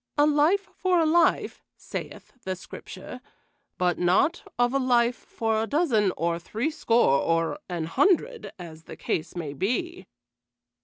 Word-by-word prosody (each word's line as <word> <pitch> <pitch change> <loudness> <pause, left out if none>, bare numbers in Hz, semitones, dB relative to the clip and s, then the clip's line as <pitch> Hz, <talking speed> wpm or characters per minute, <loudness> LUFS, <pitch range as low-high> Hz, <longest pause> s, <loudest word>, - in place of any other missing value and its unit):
'A 290 - +5
life 305 +7 +3
for 365 -2 +2
a 325 - +3
life,' 330 +2 +2 0.2
saith - - -7
the 190 0 -3
Scripture, 190 +6 -10 0.6
but 180 -1 +1
naught 185 - +2 0.2
of 245 +1 +2
a 275 - +2
life 245 -2 +3
for 225 -1 -2
a 225 - -2
dozen 240 - +2
or 170 0 0
threescore, 225 - +1
or 165 - 0
an 175 -2 -2
hundred, 395 - +1
as 160 -3 -11
the - - -10
case 160 +2 -3
may 160 -5 -4
be." 190 - -2
225 Hz, 145 wpm, -26 LUFS, -, 0.6 s, A